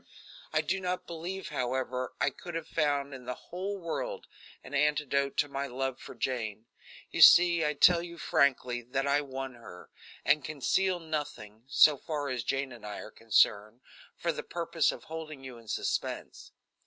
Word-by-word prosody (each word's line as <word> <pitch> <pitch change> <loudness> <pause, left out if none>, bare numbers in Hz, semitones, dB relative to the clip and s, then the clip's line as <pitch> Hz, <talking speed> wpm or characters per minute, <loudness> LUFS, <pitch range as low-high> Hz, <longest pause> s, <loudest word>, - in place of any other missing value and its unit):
I - - +2
do 190 - -1
not 180 0 -2
believe, 175 +3 -5
however, 130 0 -2
I - - +2
could 175 -2 -9
have 165 -1 -4
found 145 -2 0
in 130 -2 -9
the 125 0 -3
whole 195 +3 -5
world 170 -3 -4 0.4
an 130 - -11
antidote 140 -1 +1
to 145 - +3
my 140 0 -3
love 130 0 -3
for - - -10
Jane. 110 -4 -3 0.5
You - - -1
see 170 -1 +8
I 150 0 0
tell 170 +3 +6
you 170 0 -8
frankly 130 -7 +2
that 135 +3 -2
I 140 +1 +3
won 135 -2 -5
her, 115 -7 -13 0.3
and 145 0 +4
conceal 165 +6 +1
nothing, 145 -9 -5
so 145 +1 +6
far 145 -1 -3
as 125 -2 -2
Jane 135 +1 -1
and 120 -3 -12
I 105 -1 -6
are - - -8
concerned, 110 +1 +2 0.4
for 170 - 0
the - - -5
purpose 170 -2 0
of - - -9
holding 155 -3 -7
you 130 -3 -9
in 115 - -18
suspense. - - -3
140 Hz, 175 wpm, -30 LUFS, 125-165 Hz, 0.5 s, see